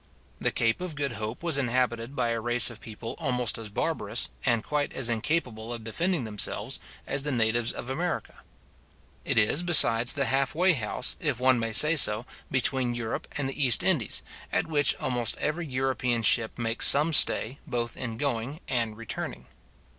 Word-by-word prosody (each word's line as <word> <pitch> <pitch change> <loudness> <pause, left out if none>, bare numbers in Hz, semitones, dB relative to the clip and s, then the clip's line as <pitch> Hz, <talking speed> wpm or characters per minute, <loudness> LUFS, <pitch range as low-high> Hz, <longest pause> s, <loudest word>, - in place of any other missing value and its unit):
The - - 0
Cape 115 +6 -1
of 180 -4 -5
Good 140 -1 -3
Hope 110 +7 -6
was 165 -5 0
inhabited 125 0 -2
by 120 - -1
a 115 0 -2
race 120 0 +2
of 115 - -12
people 115 +1 -8
almost 125 -7 -1
as 110 -2 -7
barbarous, 105 - -1
and 120 -2 0
quite 145 -1 -2
as 125 -3 +2
incapable 115 -2 -3
of 120 -2 -6
defending 165 +7 -2
themselves, 105 -3 0 0.3
as 140 - -3
the 145 +1 -3
natives 120 -1 0
of - - -8
America. 175 +6 -4 0.9
It - - -1
is, 110 +8 +3
besides, 125 -9 +6
the 140 - -1
half 135 +1 -1
way 185 +2 +3
house, 125 -1 0
if 145 -6 -2
one 130 -1 +3
may 115 0 -3
say 150 +8 +6
so, 115 -5 +4 0.2
between 130 -1 -1
Europe 115 -2 -5
and 140 -2 -2
the 135 +2 -3
East 120 -7 +3
Indies, - - 0 0.3
at - - 0
which 150 -3 +1
almost 120 -3 +1
every 160 +2 -3
European 125 -3 -1
ship 110 +1 +3
makes 115 -1 +3
some 150 +3 +6
stay, 135 -2 +4
both 120 -1 -3
in 115 -3 -6
going 135 +1 -3
and 115 -4 -2
returning. 65 - -7
125 Hz, 175 wpm, -26 LUFS, 115-140 Hz, 0.9 s, besides